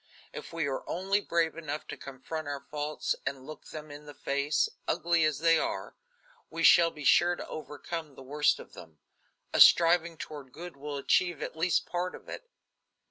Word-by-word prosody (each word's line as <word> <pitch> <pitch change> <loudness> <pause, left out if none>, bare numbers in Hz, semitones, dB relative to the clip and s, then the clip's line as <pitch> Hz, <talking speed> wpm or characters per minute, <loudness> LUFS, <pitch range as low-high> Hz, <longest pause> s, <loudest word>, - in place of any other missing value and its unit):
If - - -8
we 165 -2 -1
are 135 -2 -2
only 195 +3 0
brave 170 -4 0
enough 155 -2 -5
to - - -4
confront 145 +3 -7
our 140 -1 -5
faults 150 0 -2
and 135 -1 -4
look 155 +1 -10
them 155 -1 -9
in 145 +1 -11
the 145 - -10
face, 140 +2 0 0.2
ugly 170 -1 +2
as 155 -3 +1
they 165 +1 +4
are, - - -3 0.5
we 165 - -4
shall 170 0 +7
be 150 -3 -10
sure 175 +5 +5
to - - -8
overcome 155 0 -6
the 135 - -11
worst 145 +2 +2
of - - -12
them. 80 -2 -13 0.6
A - - +1
striving 170 -1 +6
toward 145 -5 -9
good 175 0 -9
will 145 +1 -6
achieve 170 +4 +1
at - - -6
least 165 +2 +2
a - - -26
part 180 +1 -2
of - - -14
it." - - -8
155 Hz, 190 wpm, -29 LUFS, 145-170 Hz, 0.6 s, shall